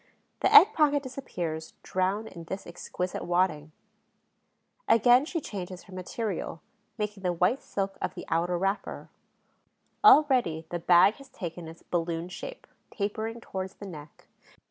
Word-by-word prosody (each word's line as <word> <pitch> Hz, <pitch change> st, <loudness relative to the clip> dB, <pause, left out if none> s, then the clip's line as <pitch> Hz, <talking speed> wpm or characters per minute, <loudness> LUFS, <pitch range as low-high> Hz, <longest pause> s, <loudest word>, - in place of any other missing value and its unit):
The -, -, +2 dB
egg 435 Hz, 0 st, +9 dB
pocket 290 Hz, -4 st, +3 dB
disappears, 175 Hz, -, -5 dB
drowned 195 Hz, +4 st, -1 dB
in 170 Hz, -1 st, -10 dB
this 190 Hz, +4 st, -6 dB
exquisite 180 Hz, +1 st, -5 dB
wadding. 175 Hz, -4 st, 0 dB, 1.2 s
Again 245 Hz, +4 st, +5 dB
she 335 Hz, +1 st, -2 dB
changes 185 Hz, -, -7 dB
her 190 Hz, -, -15 dB
material, 185 Hz, -2 st, -4 dB, 0.4 s
making 210 Hz, -2 st, -3 dB
the 180 Hz, -1 st, 0 dB
white 180 Hz, +10 st, +1 dB
silk 195 Hz, -1 st, -4 dB
of -, -, -3 dB
the 175 Hz, -, -7 dB
outer 175 Hz, +2 st, 0 dB
wrapper. 195 Hz, +3 st, -3 dB, 0.9 s
Already 260 Hz, -, +5 dB
the 175 Hz, -, -2 dB
bag 175 Hz, +5 st, +5 dB
has 275 Hz, -1 st, -14 dB
taken 175 Hz, -7 st, -7 dB
its 165 Hz, +1 st, -12 dB
balloon 170 Hz, 0 st, -2 dB
shape, -, -, -8 dB, 0.2 s
tapering 220 Hz, +3 st, -3 dB
towards 190 Hz, -3 st, -5 dB
the 200 Hz, -, -10 dB
neck. 150 Hz, -5 st, -11 dB
190 Hz, 140 wpm, -28 LUFS, 175-230 Hz, 1.2 s, egg